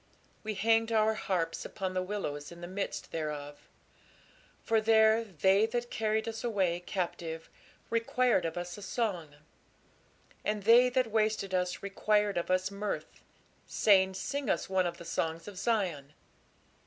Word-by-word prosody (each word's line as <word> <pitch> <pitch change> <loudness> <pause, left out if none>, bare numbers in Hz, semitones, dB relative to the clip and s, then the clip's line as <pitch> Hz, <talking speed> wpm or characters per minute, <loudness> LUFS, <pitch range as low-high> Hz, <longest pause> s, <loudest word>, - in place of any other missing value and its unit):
We 215 -1 -3
hanged 225 +2 +2
our 220 0 +3
harps 175 -6 -2
upon 190 -2 -4
the 185 - 0
willows 180 -7 -4
in 170 0 -11
the 175 - -6
midst 195 +2 -4
thereof. 150 -2 -5 0.9
For 225 -1 +2
there 220 0 +5
they 195 +2 +3
that 240 +1 -3
carried 220 0 0
us 225 0 -5
away 190 -7 +1
captive 170 -3 -4 0.4
required 230 -2 +2
of 165 +1 -3
us 175 +3 -5
a - - -11
song; 185 -8 -2 1.1
and 210 -1 -1
they 240 +4 +7
that 250 -2 0
wasted 215 -3 0
us 180 0 -1
required 205 0 +1
of 170 - -5
us 185 +1 +1
mirth, 200 +1 -5 0.5
saying, 190 -3 +4
Sing 280 +6 -3
us - - 0
one 190 -1 +1
of 170 0 -5
the 170 - -10
songs 165 +2 -2
of 205 - -8
Zion. 180 - -1
200 Hz, 150 wpm, -31 LUFS, 175-220 Hz, 1.1 s, they